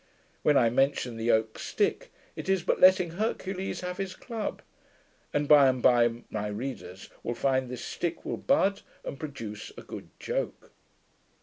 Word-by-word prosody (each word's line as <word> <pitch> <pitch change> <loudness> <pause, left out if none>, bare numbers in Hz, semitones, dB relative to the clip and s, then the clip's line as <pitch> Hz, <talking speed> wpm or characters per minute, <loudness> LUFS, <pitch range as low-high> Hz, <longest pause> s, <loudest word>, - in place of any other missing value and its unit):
When 150 -2 +4
I 115 -2 +4
mention 135 -2 +1
the 115 +1 -2
oak 110 -1 +2
stick, - - -1 0.2
it - - -6
is 190 -3 +2
but - - +1
letting 185 -2 +6
Hercules 190 -1 -2
have 180 0 -4
his 195 -1 -4
club; 225 -4 -5 0.7
and, 145 0 0
by 145 -2 +8
and 130 -1 +2
by, 120 -1 +4
my 105 -1 -2
readers 105 -4 -6
will 120 - -3
find 130 +1 +1
this 125 -1 -6
stick 170 -1 -3
will - - -2
bud, 200 -8 +2 0.2
and 135 - -5
produce 115 -9 -6
a - - -8
good - - -9
joke. - - -3
135 Hz, 165 wpm, -28 LUFS, 120-185 Hz, 0.7 s, by